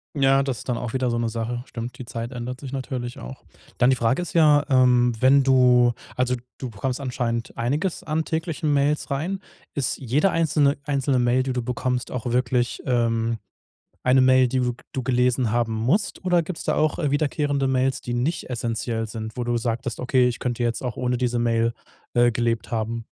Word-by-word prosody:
Ja, 135 0 +4
das 135 -3 -3
ist - - -9
dann 120 - 0
auch 120 -1 -5
wieder 130 -1 0
so 120 - 0
'ne 115 -1 0
Sache. 115 +2 -3
Stimmt, 120 +1 -7
die 125 - -8
Zeit 115 0 -5
ändert 125 +1 -5
sich 135 -2 -8
natürlich 130 -2 -4
auch. - - -9 0.4
Dann 125 +1 +5
die 130 - +4
Frage 120 +7 +1
ist 175 - -6
ja, 150 -3 +5
ähm, 125 -2 +4
wenn 135 +2 +5
du 125 -2 +5 0.2
also, 125 0 +1 0.2
du 130 - -4
bekommst 125 +5 -3
anscheinend 120 -3 -3
einiges 145 +10 -1
an 160 +1 -1
täglichen 160 -2 -2
Mails 145 +2 +1
rein. 165 +8 -2 0.3
Ist 140 -4 -1
jede 135 +8 +1
einzelne 150 -4 +2
einzelne 140 -2 0
Mail, 125 +1 +3
die 130 0 -2
du 125 - -2
bekommst, 125 +1 -2
auch 125 -1 -4
wirklich, 125 0 0
ähm, 115 -2 +1 0.6
eine 130 +1 +4
Mail, 130 0 +5
die 130 +1 -1
du 125 -1 0 0.2
du 130 - -2
gelesen 125 -2 +1
haben 120 -1 +1
musst? 125 - 0
Oder 180 -2 +3
gibt's 160 +1 -6
da - - +1
auch, 155 0 +1
äh, 150 -4 0
wiederkehrende 145 -1 0
Mails, 130 0 +1
die 120 - -4
nicht 130 +5 -2
essenziell 115 -1 -2
sind, 110 +1 -7
wo 120 - -1
du 120 0 0
sagtest: 120 +1 -2
„Okay, 125 0 +3
ich 120 - -3
könnte 120 -1 -2
jetzt 120 -1 -1
auch 125 -2 -4
ohne 125 -1 0
diese 120 -1 0
Mail, 115 0 +1 0.4
äh, 120 0 +4
gelebt 115 -1 -1
haben?“ 115 0 -2
125 Hz, 200 wpm, -24 LUFS, 120-135 Hz, 0.6 s, Dann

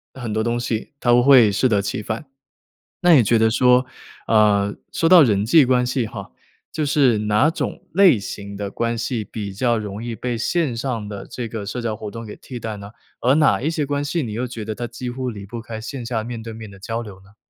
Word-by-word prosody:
很 120 -5 -5
多 110 +1 0
东 120 +1 -1
西 120 +2 -3
它 120 -3 +3
会 125 -5 +7
适 125 +6 +2
得 100 -3 +2
其 100 - -3
反。 110 +6 -4 0.8
那 175 -1 +6
也 135 - +7
觉 115 +1 +3
得 110 0 +3
说， 125 +2 +4 0.4
呃， 105 -2 +3 0.2
说 165 - 0
到 175 0 +8
人 105 -6 +2
际 145 +7 +6
关 125 -1 +3
系 125 -1 -1
哈， 85 - -9 0.4
就 155 - -1
是 135 -6 +3
哪 105 +7 +2
种 - - -5
类 185 - +6
型 100 0 -7
的 100 -1 -4
关 115 +3 -2
系 115 -1 -2
比 100 -1 -6
较 120 +3 +1
容 105 0 -6
易 120 -1 -4
被 120 +2 -3
线 135 +2 0
上 115 -3 -3
的 100 -1 -7
这 120 - -5
个 110 -2 -6
社 115 +5 -4
交 115 -2 -2
活 105 -1 -7
动 115 +2 -8
给 105 - -9
替 125 - -9
代 110 -2 -5
呢， 100 0 -9 0.3
而 125 +3 +3
哪 140 -10 +3
一 155 - 0
些 155 -3 -1
关 145 0 -1
系 160 +3 -1
你 115 -5 -4
又 120 +4 -2
觉 115 -3 -7
得 110 0 -4
它 120 - -4
几 120 +2 -7
乎 130 0 -3
离 100 -3 -8
不 115 +3 -7
开 115 -1 -7
线 125 +2 -6
下 115 -2 -2
面 115 -1 -6
对 115 0 -7
面 110 -1 -9
的 100 - -14
交 115 +4 -4
流 105 -4 -10
呢？ 100 +2 -21
115 Hz, 255 characters per minute, -21 LUFS, 105-125 Hz, 0.8 s, 到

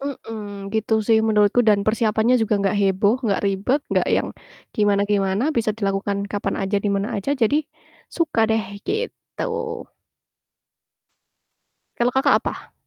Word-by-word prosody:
Mhm, 210 -7 -7
gitu 220 0 -1
sih 225 -1 +5
menurutku 210 +2 +3
dan 200 -1 +3
persiapannya 220 +1 +2
juga 220 -1 +1 0.2
gak 205 - -1
heboh, 200 +3 +3
gak 195 - +1
ribet, 200 +9 +1 0.2
gak - - +2
yang - - +1 0.5
gimana-gimana, 205 +4 +1
bisa 230 -2 +1
dilakukan 200 -1 -1
kapan 200 -1 -2
aja, 195 +1 0
di 210 - 0
mana 200 +3 -1
aja, 205 +7 -3
jadi 250 +2 +2 0.5
suka 325 -9 0
deh 220 -1 +1 0.2
gitu. 450 +4 -4 2.5
Kalau 240 +1 +1
Kakak 265 +1 +4
apa? - - -6
210 Hz, 130 wpm, -22 LUFS, 200-230 Hz, 2.5 s, sih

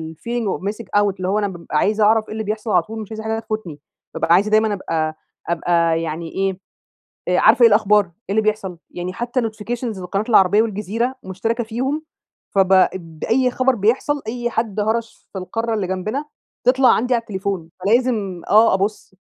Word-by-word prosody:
الfeeling 235 +5 -3
of - - -18
Missing 230 0 -10 0.2
Out 200 -2 +1
اللي 185 0 -3
هو 205 +2 +1
أنا 205 - 0
بابقى 170 -4 -4
عايزة 210 +4 +2
أعرف 220 +1 +4
إيه - - -10
اللي 220 0 -3
بيحصل 215 +1 -3
على 180 - +5
طول، 220 +2 -7
مش 215 - -10
عايزة 220 0 -6
حاجة 220 0 -1
تفوتني. 215 -9 -5 0.3
بابقى 165 +1 +2
عايزة 205 +4 +3
دايمًا 215 -1 +3
أبقى 160 -5 -2 0.3
أبقى 170 -1 +1
يعني 165 +1 -4
إيه 195 -1 -1 0.7
آآ - - +2
عارفة 245 - +5
إيه 230 - +9
الأخبار، 210 -1 +4
إيه 170 - -22 0.2
اللي 220 +2 +3
بيحصل. 205 -5 -2
يعني 180 +1 -5
حتّى 240 +4 -2
notifications 225 -1 -4
لقناة 195 +4 -2
العربيّة 205 -1 +5
والجزيرة 225 +4 -2
مشتركة 225 +6 -2
فيهم. 265 +7 -2 0.5
فب 190 -1 +3
اب 170 -4 +1
أي 250 +2 +2
خبر 255 +1 +2
بيحصل، 250 +7 0
أي 240 +1 -2
حد 220 -3 -2
هرش 225 +2 -2
في 195 - -5
القارة 225 +5 -2
اللي 200 -4 -1
جنبنا 215 +10 -3 0.4
تطلع 255 +1 +5
عندي 250 +2 +3
على 235 - +2
التليفون. 195 -6 -4 0.2
فلازم 215 -5 +1
آه 215 0 +6
أبُص. 195 0 -2
215 Hz, 185 wpm, -20 LUFS, 190-230 Hz, 0.7 s, إيه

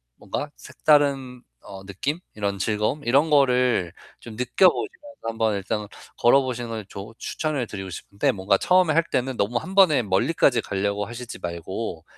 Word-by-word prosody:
뭔가 145 - -5
색다른 140 -4 +1 0.2
어 95 -1 -11
느낌? 135 - -3 0.2
이런 100 -2 -2
즐거움? 105 +9 -1
이런 140 +6 +3
거를 125 - +3 0.3
좀 115 -2 -10
느껴보시면서 190 - +1
한번 110 -2 0
일단 105 +2 -3 0.3
걸어보시는 125 -1 +2
걸 110 -3 -5
조 100 +4 -9
추천을 150 -7 -2
드리고 95 -2 -6
싶은데 100 +3 -1
뭔가 95 0 +2
처음에 180 -4 +3
할 165 +1 +3
때는 130 0 -1
너무 115 +4 0
1 185 +4 -8
번에 160 -10 +5
멀리까지 115 - +2
가려고 100 +1 -2
하시지 120 +3 -8
말고 85 +1 -5
120 Hz, 335 characters per minute, -24 LUFS, 100-140 Hz, 0.3 s, 번에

